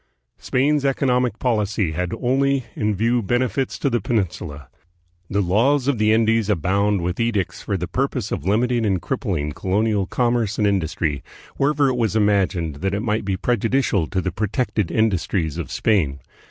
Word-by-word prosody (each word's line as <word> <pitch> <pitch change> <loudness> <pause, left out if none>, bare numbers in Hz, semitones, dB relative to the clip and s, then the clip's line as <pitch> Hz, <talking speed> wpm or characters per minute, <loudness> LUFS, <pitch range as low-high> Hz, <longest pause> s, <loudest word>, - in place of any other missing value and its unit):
Spain's 140 +3 +1
economic 125 -4 +1
policy 105 -7 0
had 90 +3 -2
only 135 +1 +1
in 105 -1 0
view 115 +4 +1
benefits 125 +5 -1
to - - -1
the 120 -4 +1
Peninsula. 85 - -3 0.6
"The 100 0 +1
Laws 125 +9 +2
of 140 -6 +1
the 110 0 +3
Indies" 110 -1 +2
abound 100 +1 +1
with 90 +1 -2
edicts 115 -6 -1
for 100 - -2
the 90 0 -4
purpose 125 +1 -2
of - - -3
limiting 120 +4 +1
and 95 -4 +1
crippling 85 - -2
colonial 100 +4 0
commerce 120 -4 0
and 105 - +2
industry, 80 -7 0 0.4
wherever 145 0 +2
it 130 -2 0
was 110 -3 0
imagined 95 -7 +1
that 95 +5 -1
it 100 - -2
might 110 -2 0
be 95 -1 -1
prejudicial 115 - +1
to 95 - -1
the 95 - -2
protected 105 - -1
industries 95 -7 0
of - - -5
Spain. 80 -11 +1
105 Hz, 165 wpm, -22 LUFS, 95-120 Hz, 0.6 s, the